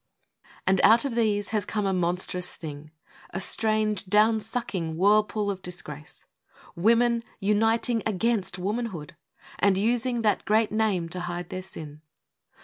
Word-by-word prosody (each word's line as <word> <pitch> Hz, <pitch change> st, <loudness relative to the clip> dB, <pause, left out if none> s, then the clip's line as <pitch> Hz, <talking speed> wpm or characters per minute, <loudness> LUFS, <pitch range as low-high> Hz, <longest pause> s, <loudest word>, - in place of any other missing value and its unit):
And 190 Hz, -1 st, +3 dB
out 230 Hz, +4 st, +6 dB
of 275 Hz, -, -2 dB
these 210 Hz, -3 st, 0 dB
has 215 Hz, -2 st, 0 dB
come 210 Hz, +1 st, -2 dB
a 195 Hz, -, +1 dB
monstrous 180 Hz, 0 st, -1 dB
thing, 150 Hz, -1 st, -8 dB, 0.4 s
A 190 Hz, -, -5 dB
strange, 215 Hz, 0 st, +1 dB
down 215 Hz, +3 st, +4 dB
sucking 200 Hz, -7 st, -2 dB
whirlpool 210 Hz, +2 st, +2 dB
of 190 Hz, -1 st, -7 dB
disgrace, 150 Hz, -5 st, -8 dB, 0.5 s
Women 235 Hz, +5 st, +3 dB, 0.2 s
uniting 225 Hz, +3 st, +1 dB
against 215 Hz, -2 st, -1 dB
womanhood, 190 Hz, -4 st, -4 dB, 0.4 s
And 195 Hz, -1 st, +3 dB
using 240 Hz, +3 st, 0 dB
that 210 Hz, -3 st, +1 dB
great 215 Hz, +1 st, +2 dB
name 210 Hz, -6 st, 0 dB
to 180 Hz, -, -5 dB
hide 175 Hz, -1 st, -5 dB
their 185 Hz, -, -4 dB
sin! 155 Hz, -5 st, -9 dB
205 Hz, 140 wpm, -26 LUFS, 180-225 Hz, 0.5 s, out